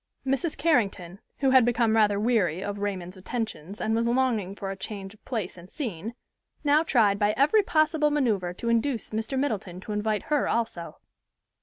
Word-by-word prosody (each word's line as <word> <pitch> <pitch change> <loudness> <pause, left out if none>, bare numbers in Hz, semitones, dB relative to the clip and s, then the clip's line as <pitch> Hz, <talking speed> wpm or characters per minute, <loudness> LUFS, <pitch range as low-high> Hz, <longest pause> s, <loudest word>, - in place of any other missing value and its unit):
Mrs. 270 +4 -1
Carrington, 200 - 0 0.2
who 270 -2 +3
had 260 -2 +7
become 230 -2 +2
rather 205 -2 +3
weary 200 -6 +1
of 205 0 -4
Raymond's 190 -2 -4
attentions 200 -3 -5
and 220 - 0
was 230 +1 +1
longing 235 -6 +1
for 195 -2 -5
a - - -5
change 195 0 -7
of 215 - -23
place 210 -7 -4
and 175 +2 -14
scene, 225 - -5 0.5
now 295 +1 +4
tried 220 -10 +3
by 210 0 +2
every 300 - +5
possible 310 -4 +2
maneuver 225 -12 +1
to 180 +6 -6
induce 235 0 0
Mr. 220 +5 -2
Middleton 210 -10 -2
to 210 - -7
invite 210 0 -1
her 295 -2 0
also. 225 -7 -2
220 Hz, 175 wpm, -27 LUFS, 195-260 Hz, 0.5 s, had